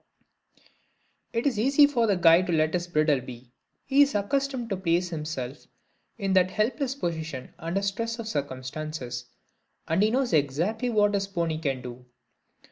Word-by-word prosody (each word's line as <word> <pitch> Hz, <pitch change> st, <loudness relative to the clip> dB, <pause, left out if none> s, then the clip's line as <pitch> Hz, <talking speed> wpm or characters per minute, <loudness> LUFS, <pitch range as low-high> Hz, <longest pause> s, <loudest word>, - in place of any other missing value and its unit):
It 230 Hz, +2 st, -2 dB
is 250 Hz, -7 st, +1 dB
easy 275 Hz, +5 st, +6 dB
for 245 Hz, -5 st, +1 dB
the 200 Hz, -3 st, +2 dB
guide 170 Hz, +1 st, +5 dB
to 175 Hz, -, 0 dB
let 155 Hz, 0 st, +2 dB
his 175 Hz, -1 st, -1 dB
bridle 155 Hz, -5 st, +2 dB
be 125 Hz, -1 st, -11 dB, 0.3 s
he 275 Hz, +1 st, +4 dB
is 285 Hz, -3 st, +4 dB
accustomed 260 Hz, +3 st, -1 dB
to -, -, +1 dB
place 180 Hz, 0 st, +1 dB
himself 150 Hz, -5 st, -5 dB, 0.5 s
in 195 Hz, -3 st, -1 dB
that 185 Hz, -1 st, +4 dB
helpless 250 Hz, +7 st, -1 dB
position 160 Hz, -, -4 dB
under 175 Hz, +4 st, -2 dB
stress 230 Hz, +4 st, -2 dB
of 230 Hz, -2 st, -6 dB
circumstances, 130 Hz, -, -4 dB, 0.6 s
and 165 Hz, +4 st, +1 dB
he 210 Hz, -, +4 dB
knows 255 Hz, -2 st, 0 dB
exactly 165 Hz, -, +1 dB
what 205 Hz, -3 st, +3 dB
his 200 Hz, -1 st, 0 dB
pony 170 Hz, -5 st, -2 dB
can 135 Hz, -5 st, -2 dB
do. 125 Hz, 0 st, -8 dB
180 Hz, 160 wpm, -27 LUFS, 155-225 Hz, 0.6 s, easy